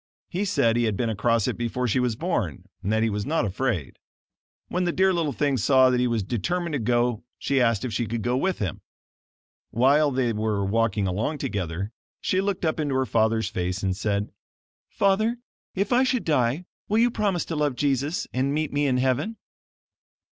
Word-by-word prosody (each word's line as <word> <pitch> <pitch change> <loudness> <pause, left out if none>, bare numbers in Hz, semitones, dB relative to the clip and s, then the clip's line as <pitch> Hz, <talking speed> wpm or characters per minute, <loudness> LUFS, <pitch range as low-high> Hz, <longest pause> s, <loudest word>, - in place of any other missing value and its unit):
He 190 +3 -1
said 120 - +2
he 120 - +2
had 105 -3 0
been 115 -2 0
across 115 +1 +1
it - - -1
before 120 +2 -1
she 120 +3 +1
was 125 -3 0
born, - - -2 0.2
and 100 - -2
that 110 0 +2
he 115 - +2
was 105 0 -2
not 155 -1 0
afraid. 100 - -2 0.7
When 180 0 -1
the 175 - +1
dear 190 +2 +3
little 165 -4 0
thing 140 0 0
saw 130 +2 +5
that 125 - +2
he 125 - +2
was 115 -4 0
determined 170 - -2
to 145 - 0
go 120 0 +1
she 135 -2 +1
asked 115 -2 +2
if 120 - -4
she 115 +2 -1
could 115 0 -3
go 120 +1 +1
with 185 +8 0
him. 95 -6 -3 0.9
While 140 +6 +4
they 125 -3 0
were 105 -2 -1
walking 105 -1 +1
along 105 +11 -1
together, 100 - -3 0.3
she 185 - +1
looked 195 -2 -1
up 160 0 0
into 145 -3 0
her 130 0 +2
father's 110 -2 +1
face, 90 -1 -3
and 95 -1 0
said: 100 0 -1 0.6
"Father, 215 +4 +2 0.4
if 200 +4 0
I 250 +2 +5
should 255 -6 0
die, 145 +2 +1 0.2
will 215 - +2
you 240 +1 +4
promise 200 -6 0
to 165 - -4
love 150 -3 0
Jesus 140 +4 0
and 135 +3 0
meet 155 -2 -1
me 145 0 +2
in 130 -2 +2
heaven?" 135 - 0
125 Hz, 200 wpm, -25 LUFS, 110-155 Hz, 0.9 s, saw